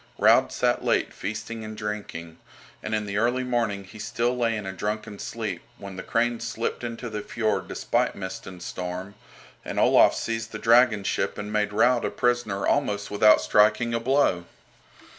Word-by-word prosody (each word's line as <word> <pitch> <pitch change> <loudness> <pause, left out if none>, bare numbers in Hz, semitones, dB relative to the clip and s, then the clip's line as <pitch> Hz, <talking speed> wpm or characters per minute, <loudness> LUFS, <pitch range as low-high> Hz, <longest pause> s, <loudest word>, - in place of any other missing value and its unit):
Raud - - +5
sat - - 0
late - - +1
feasting 110 +3 -5
and 110 0 -7
drinking, 100 -6 -6 0.4
and 110 - -2
in 105 -1 -2
the 100 0 -3
early 120 +4 +1
morning 115 -5 -1
he 95 +3 -13
still 120 +3 -1
lay 115 -2 0
in 105 - -6
a 95 - -4
drunken 105 +1 -4
sleep 105 -7 -4 0.2
when 100 -1 -9
the 95 - -5
"Crane" 120 +2 0
slipped 115 0 -3
into 120 0 -5
the 105 -2 -4
fiord 110 0 -1
despite - - 0
mist 95 -1 -6
and 90 -2 -9
storm, 90 +2 -5 0.5
and - - -3
Olaf - - +5
seized 115 0 -3
the - - -3
dragon 115 -2 +4
ship 95 0 -1
and 105 +1 -5
made 105 -1 +1
Raud 120 +3 +3
a - - 0
prisoner 120 -5 0
almost 105 -8 0
without 105 +1 +6
striking 110 +3 +3
a 115 - +1
blow. 115 -8 +2
110 Hz, 180 wpm, -25 LUFS, 100-115 Hz, 0.5 s, without